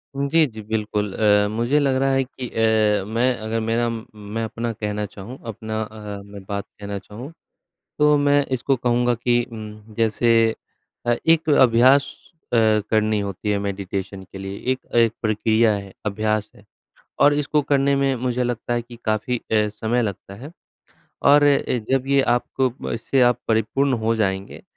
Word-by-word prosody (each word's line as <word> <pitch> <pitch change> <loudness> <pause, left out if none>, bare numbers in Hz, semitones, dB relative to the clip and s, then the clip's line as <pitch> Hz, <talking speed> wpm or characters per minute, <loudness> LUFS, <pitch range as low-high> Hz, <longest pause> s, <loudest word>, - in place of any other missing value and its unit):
उ, 140 0 -1
जी, 160 +1 +4
जी, 110 -2 -10
बिल्कुल, 105 -2 -2
अ, 105 -1 +3
मुझे 120 +7 +1
लग 135 -2 +1
रहा 135 - +2
है 135 0 +2
कि 125 -1 -8
अ, 110 -3 +2
मैं 120 +3 +1
अगर 110 +1 -2
मेरा 115 +2 0
उम, 115 -1 -4
मैं 105 +2 -5
अपना 115 +1 -3
कहना 105 -1 -3
चाहूँ, 105 +6 -10
अपना 110 0 -4
अ, 105 -2 -7
मैं 100 -1 -11
बात 100 +1 -3
कहना 100 0 -5
चाहूँ, 115 +10 -10 0.7
तो 150 0 +5
मैं 145 0 +4
इसको 135 +2 0
कहूँगा 120 0 +1
कि 120 +1 +1
उम, 110 -1 -10
जैसे 115 +1 +2 0.7
अ, 120 - +3
एक 165 -1 +3
अभ्यास 130 +1 +5 0.4
अ, - - +3 0.3
करनी 110 -1 +2
होती 100 +1 -4
है 100 - +1
मेडिटेशन 100 -1 -4
के 95 - -8
लिए। 95 +1 -6
एक 130 - -6
अ, - - -5
एक 115 -1 +4
प्रक्रिया 110 +1 +2
है 100 -1 -7
अभ्यास 110 0 -1
है, 105 - -19 0.6
और 145 +1 +6
इसको 150 0 +1
करने 140 0 +2
में 135 -1 +1
मुझे 125 0 0
लगता 120 0 -3
है 120 - -1
कि 120 0 -13
काफ़ी 110 +3 0
अ, 105 -2 0
समय 110 +3 -1
लगता 100 -2 -5
है 140 +10 -10 0.7
और 145 +1 +6
अ, 145 -1 +4 0.3
जब 135 0 +1
ये 140 0 +4 0.2
आपको 130 0 -2 0.2
इससे 125 +3 0
आप 120 0 +4
परिपूर्ण 115 +5 +1
हो 115 - +3
जाएँगे, 95 -2 -2
115 Hz, 175 wpm, -22 LUFS, 105-130 Hz, 0.7 s, और